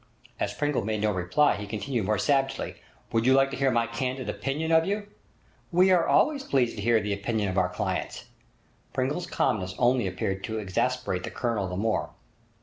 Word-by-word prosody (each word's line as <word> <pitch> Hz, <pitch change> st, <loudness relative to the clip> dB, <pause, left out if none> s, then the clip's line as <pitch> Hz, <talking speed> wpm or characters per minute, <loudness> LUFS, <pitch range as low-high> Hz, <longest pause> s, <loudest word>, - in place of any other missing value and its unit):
As -, -, -1 dB
Pringle 145 Hz, -5 st, 0 dB
made 110 Hz, +1 st, -1 dB
no 105 Hz, 0 st, +2 dB
reply, 95 Hz, +11 st, +2 dB
he 105 Hz, 0 st, -6 dB
continued 110 Hz, 0 st, -2 dB
more 110 Hz, -, +2 dB
savagely: 135 Hz, -2 st, 0 dB, 0.3 s
'Would 115 Hz, +1 st, +1 dB
you 130 Hz, -, +6 dB
like 135 Hz, 0 st, +3 dB
to -, -, -3 dB
hear 135 Hz, 0 st, +2 dB
my 115 Hz, -2 st, +2 dB
candid 125 Hz, +2 st, -3 dB
opinion 155 Hz, +4 st, -2 dB
of 160 Hz, 0 st, +5 dB
you?' 205 Hz, +3 st, -2 dB, 0.7 s
'We 180 Hz, +2 st, +5 dB
are 175 Hz, -2 st, +4 dB
always 290 Hz, -3 st, +3 dB
pleased 130 Hz, -, +1 dB
to -, -, -4 dB
hear 115 Hz, +1 st, +3 dB
the 105 Hz, -1 st, -2 dB
opinion 105 Hz, 0 st, -1 dB
of 95 Hz, -, -3 dB
our 90 Hz, -1 st, +2 dB
clients.' 90 Hz, -, -3 dB, 0.7 s
Pringle's 140 Hz, +7 st, -1 dB
calmness 95 Hz, -3 st, -1 dB
only 120 Hz, -3 st, +3 dB
appeared 95 Hz, +1 st, -3 dB
to 110 Hz, -2 st, -4 dB
exasperate 105 Hz, 0 st, -1 dB
the -, -, -5 dB
Colonel 115 Hz, -6 st, -1 dB
the 90 Hz, 0 st, -4 dB
more. 110 Hz, +2 st, 0 dB
120 Hz, 190 wpm, -27 LUFS, 105-135 Hz, 0.7 s, you